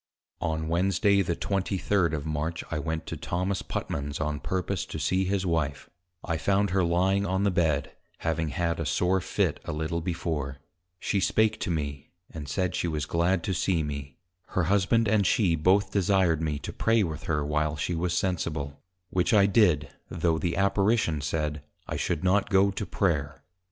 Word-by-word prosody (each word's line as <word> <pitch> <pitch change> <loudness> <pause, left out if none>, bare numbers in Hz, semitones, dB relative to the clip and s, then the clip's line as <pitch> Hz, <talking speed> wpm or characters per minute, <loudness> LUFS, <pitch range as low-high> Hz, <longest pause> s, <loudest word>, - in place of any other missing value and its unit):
On 80 -2 -2
Wednesday 95 +4 +3
the 85 -2 -1
23d. 95 -2 0
of 75 -1 -3
March, 80 +2 -2
I 75 - -1
went 80 +1 -3
to - - -5
Thomas 90 +2 -2
Putman's, 70 +1 -4
on 75 -2 -1
purpose 90 +3 -2
to - - -6
see 95 +6 +1
his 95 0 0
Wife: 75 -5 -1 0.3
I 85 -1 -1
found 100 +3 +1
her 95 0 +2
lying 95 +4 +2
on 95 +1 0
the 100 - +3
Bed, 80 -5 +1 0.3
having 80 -1 -1
had 85 +1 -1
a 80 - -1
sore 90 +4 +2
Fit - - 0
a - - -3
little 80 +2 -2
before; 80 -5 -3 0.4
she 100 - 0
spake 110 +2 +2
to - - -3
me, 70 -4 -3 0.2
and 75 -3 -7
said, 90 +4 -1
she - - -1
was 75 -3 -2
glad 85 +2 +1
to 95 - -1
see 85 -1 +1
me; 70 -2 -6 0.3
her 95 - 0
Husband 100 +6 +2
and 100 -2 +3
she 95 -7 +3
both 95 +5 +3
desired 95 -4 +2
me 75 -2 -1
to 70 - -7
Pray 115 -1 +2
with 80 -4 -4
her 75 -3 0
while 75 +1 0
she 80 +4 -2
was 85 +1 0
sensible; 80 -6 -2 0.3
which 90 +5 +2
I 100 -1 +6
did, 90 - +3 0.2
though 80 -1 0
the 85 +2 -1
Apparition 100 -4 +2
said, 75 0 -2 0.3
_I - - -3
should 75 - -1
not 95 +2 +2
go 100 0 +4
to 100 0 -4
Prayer. 75 -7 -1
85 Hz, 180 wpm, -27 LUFS, 75-95 Hz, 0.4 s, I